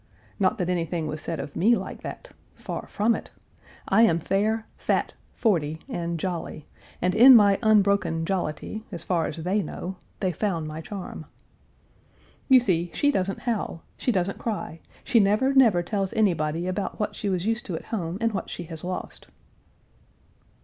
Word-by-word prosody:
Not 190 - +2
that 180 - -1
anything 170 -2 -1
was 155 0 -4
said 165 -1 -4
of 140 +1 -6
me 230 +6 +4
like - - -6
that - - -8 0.2
far - - -6
from 220 +3 +2
it. - - -5 0.6
I 200 +3 +4
am 195 -8 +5
fair, 215 +6 0
fat, - - 0 0.2
forty, 160 -8 0
and 170 -1 -3
jolly, 170 -4 -4 0.4
and 180 0 +2
in 250 +5 +9
my 200 -3 +6
unbroken 200 -7 +3
jollity, 190 +3 -3
as 170 -4 -6
far 170 -3 0
as 155 - -6
they 185 +6 0
know, 185 +2 -6 0.2
they 185 -2 0
found 170 -3 -2
my 155 +1 -6
charm. 195 +2 -7 1.2
"You 260 -1 +8
see, 175 -7 0
she 290 - +3
doesn't 195 -6 -1
howl; 220 -8 -2
she 250 - 0
doesn't 195 -2 -1
cry; 210 -7 -4 0.2
she 240 - +3
never, 215 +7 +3
never 225 -10 +5
tells 195 +2 -2
anybody 170 -7 +1
about 185 +2 -3
what 210 -1 -2
she 205 - -2
was 185 -1 -1
used 225 +2 -1
to 180 - -3
at - - -7
home 175 -4 -2
and 230 0 +1
what 195 - -3
she 175 - -5
has 165 -2 -8
lost." 180 +1 -5
190 Hz, 170 wpm, -26 LUFS, 170-215 Hz, 1.2 s, in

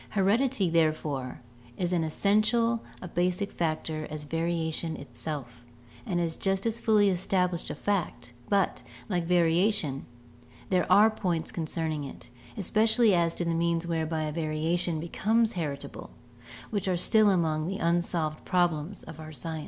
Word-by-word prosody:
Heredity, 215 +2 +2
therefore, 155 -6 0 0.4
is 180 0 -1
as 175 - +2
essential 215 +7 +2 0.2
a - - -5
basic 180 +3 -1
factor 155 -1 -2
as 155 0 -5
variation 165 +1 -2
itself, 120 -2 -7 0.4
and 180 -4 0
is 165 -2 -1
just 195 +1 0
as 230 0 -1
fully 210 -3 +4
established 180 -1 0
a - - -4
fact; 140 -12 -2 0.2
but, 200 -2 +1 0.3
like 175 -4 0
variation, 170 -3 +2 0.6
there 185 -1 +1
are 215 +2 +7
points 175 -6 -2
concerning 160 -2 -2
it, 120 -3 -10 0.3
especially 220 +2 +3
as 170 -2 +2
to 175 - -2
the 170 - 0
means 170 0 0
whereby 160 -1 -1
a 155 - -2
variation 160 +2 -1
becomes 220 +7 +1
heritable, 145 -5 -5 0.6
which 200 -3 -2
are 185 -2 +1
still 215 +4 +4
among 160 -4 +1
the 195 +1 -3
unsolved 170 -2 0
problems 175 0 0
of 160 - -10
our 155 0 -8
science. 160 +3 -5
170 Hz, 145 wpm, -28 LUFS, 155-195 Hz, 0.6 s, are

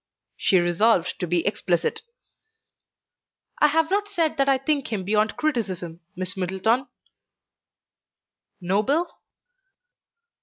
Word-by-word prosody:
She 190 - +2
resolved 175 +2 +2
to 180 - -2
be 170 0 0
explicit. 180 -4 0 1.6
"I 300 - +6
have 320 +3 +1
not 410 +1 +1
said 335 -7 -1
that 275 0 +2
I 270 - +4
think 275 -1 -1
him 205 -4 -2
beyond 210 +3 +1
criticism, 190 - -2 0.2
Miss 185 0 -4
Middleton." 190 +8 0 1.7
"Noble?" 210 - +1
215 Hz, 105 wpm, -24 LUFS, 185-285 Hz, 1.7 s, I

